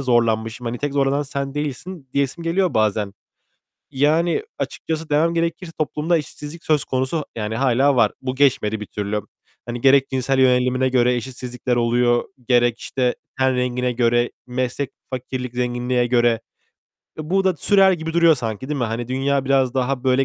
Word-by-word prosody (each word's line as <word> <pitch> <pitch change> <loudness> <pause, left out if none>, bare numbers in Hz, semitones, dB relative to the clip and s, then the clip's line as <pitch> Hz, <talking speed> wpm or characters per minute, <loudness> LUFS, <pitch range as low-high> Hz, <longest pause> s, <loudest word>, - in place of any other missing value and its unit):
zorlanmışım. 115 -1 +1
Hani, 120 +1 -3
"Tek 145 -1 -2
zorlanan 140 +1 +1
sen 140 -1 -4
değilsin." 150 +1 -5
diyesim 140 +4 -1
geliyor 180 +1 +1
bazen. 105 -2 +1 0.8
Yani, 155 - +2 0.2
açıkçası 160 0 -4
demem 165 +3 +2
gerekirse 165 +1 -2
toplumda 155 +2 0
eşitsizlik 150 +2 -8
söz 155 -2 +2
konusu, 130 +4 -1
yani 110 0 -3
hâlâ 135 +1 +3
var. 115 -3 +4
Bu 130 0 -2
geçmedi 115 -6 +2
bir 105 - -6
türlü. 105 0 -3 0.5
Hani, 120 0 -4
gerek 135 0 +5
cinsel 130 0 0
yönelimine 130 0 +3
göre 125 -1 +3
eşitsizlikler 125 0 -3
oluyor, 120 0 +2 0.2
gerek 120 -1 +3
işte, 125 -2 -1 0.2
ten 130 0 +2
rengine 125 0 0
göre, 120 0 +2 0.2
meslek, 125 +2 -2 0.2
fakirlik, 125 -1 -5
zenginliğe 125 0 0
göre. 120 -2 +2 0.8
E, 155 +2 -6
bu 195 0 +2
da 185 -3 +2
sürer 195 +3 +4
gibi 165 -1 -3
duruyor 170 -1 +5
sanki, 115 -1 -5
değil 150 -2 -2
mi? 120 - +1
Hani, 115 +1 -3
dünya 135 +1 0
biraz 135 -2 +2
daha 130 0 -1
böyle 130 +1 +3
130 Hz, 160 wpm, -21 LUFS, 120-145 Hz, 0.8 s, gerek